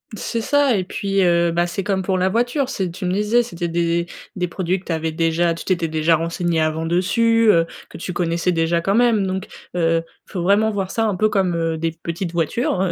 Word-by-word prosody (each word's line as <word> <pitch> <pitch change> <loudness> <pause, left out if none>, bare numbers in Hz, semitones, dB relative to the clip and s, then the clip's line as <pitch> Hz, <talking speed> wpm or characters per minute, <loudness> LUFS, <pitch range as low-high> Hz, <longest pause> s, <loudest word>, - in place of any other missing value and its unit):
C'est 230 +2 -3
ça 285 -1 +3
et 185 - 0
puis, 195 +1 -1
heu 170 -1 +3
bah, 170 +1 +1
c'est 180 +2 -3
comme 190 -1 -1
pour 185 0 0
la 185 +1 +2
voiture. 245 +5 0
C'est 185 -3 -2
tu 180 +2 -6
me 180 - 0
disais, 210 +4 +2
c'était 175 -6 -4
des 170 0 0 0.3
des 180 -1 -1
produits 185 +1 -1
que - - -21
tu - - -4
avais 160 0 -1
déjà 165 +1 +1
tu - - -8
t'étais 175 -3 0
déjà 160 +1 +2
renseigné 170 +1 -1
avant 155 +1 0
dessus, 225 +6 +3
heu, 165 -2 +3 0.2
que - - -10
tu 180 +2 -5
connaissais 170 0 0
déjà 165 0 +1
quand 195 +3 0
même. 230 -4 +3
Donc, 190 0 -3 0.3
heu, 165 -1 +2 0.2
faut 180 -4 -4
vraiment 205 +4 +3
voir 195 -3 -3
ça 225 -1 0
un 210 - 0
peu 215 +4 +2
comme, 190 -4 +1
heu, 165 -1 -1
des 165 0 -1
petites 170 +2 -5
voitures, 175 - 0
heu. 185 -2 +1
180 Hz, 230 wpm, -21 LUFS, 170-200 Hz, 0.3 s, ça